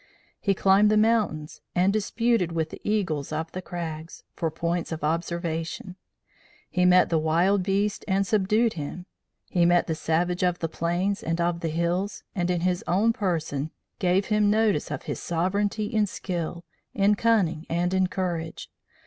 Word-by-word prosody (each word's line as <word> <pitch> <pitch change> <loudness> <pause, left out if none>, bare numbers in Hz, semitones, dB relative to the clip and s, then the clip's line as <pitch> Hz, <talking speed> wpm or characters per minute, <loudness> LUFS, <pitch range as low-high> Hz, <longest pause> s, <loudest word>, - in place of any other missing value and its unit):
He 200 -2 +1
climbed 195 +3 +5
the 215 - +3
mountains 215 -9 +1
and 185 +2 +3
"disputed 215 -3 +1
with 160 -1 -1
the - - -9
eagles 175 -10 -1
of 160 +1 -3
the 185 - -5
crags" 165 -2 -6
for 165 - -1
points 170 +2 -2
of 160 -2 -4
observation; 170 +2 -2 0.8
he 180 0 +2
met 180 0 +5
the 165 - +2
wild 170 +6 +2
beast 200 +2 0
and 195 0 +2
subdued 215 +3 +2
him; 165 +3 -6 0.4
he 175 - +1
met 175 0 +4
the 165 - -1
savage 175 +3 0
of 180 -1 +2
the 165 - -2
plains 175 +5 -1
and 165 +1 -2
of 170 0 0
the 165 - -2
hills, 170 +5 -1
and, 175 -2 -1
in 175 -2 0
his 180 0 0
own 210 +6 +3
person, 160 -8 -2 0.3
gave 185 +2 +2
him 210 -1 +2
notice 215 -6 +2
of - - -4
his - - -4
sovereignty 200 +5 0
in 210 0 +1
skill, 175 -3 -4 0.3
in 200 +1 +4
cunning 200 -8 +1
and 175 +2 0
in 190 -1 +3
courage. 175 -3 -4
180 Hz, 165 wpm, -26 LUFS, 165-200 Hz, 0.8 s, climbed